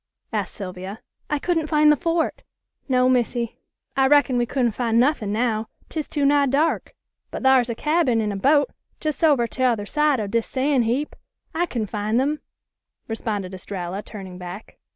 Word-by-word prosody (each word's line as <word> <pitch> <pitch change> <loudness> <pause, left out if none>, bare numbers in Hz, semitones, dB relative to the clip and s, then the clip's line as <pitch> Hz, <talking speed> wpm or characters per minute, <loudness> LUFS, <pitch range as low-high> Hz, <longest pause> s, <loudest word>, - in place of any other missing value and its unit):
asked - - -2
Sylvia. 190 +1 -6 0.3
"I 295 - +1
couldn't 325 +1 0
find 300 -1 +5
the - - +5
fort." 330 +1 -1 0.5
"No, 255 -1 +4
Missy; 240 -2 0 0.4
I 270 0 +4
reckon 285 -2 +4
we 240 -1 +1
couldn't 245 -2 +1
fin' 230 0 0
nuthin' 245 -6 +2
now, 220 0 0 0.2
'tis 310 -2 -3
too 290 -2 0
nigh 285 0 +4
dark. 295 +5 0 0.3
But - - -6
thar's 260 -2 +5
a 235 - -2
cabin 300 -4 +2
an' 210 -1 0
a - - -3
boat 285 +8 +3 0.3
jes' 305 0 -3
over 290 -7 +4
t'other 235 -4 0
side 300 +2 +2
o' 215 - -1
dis 225 +3 -1
san' 270 0 +1
heap. 245 +6 -1 0.4
I 345 +2 0
kin 230 -7 -2
fin' 210 +2 -1
them," 290 +4 +1 0.7
responded 210 -4 -3
Estralla, 185 0 -5
turning 190 -4 -9
back. 180 +4 -9
250 Hz, 175 wpm, -23 LUFS, 215-290 Hz, 0.7 s, find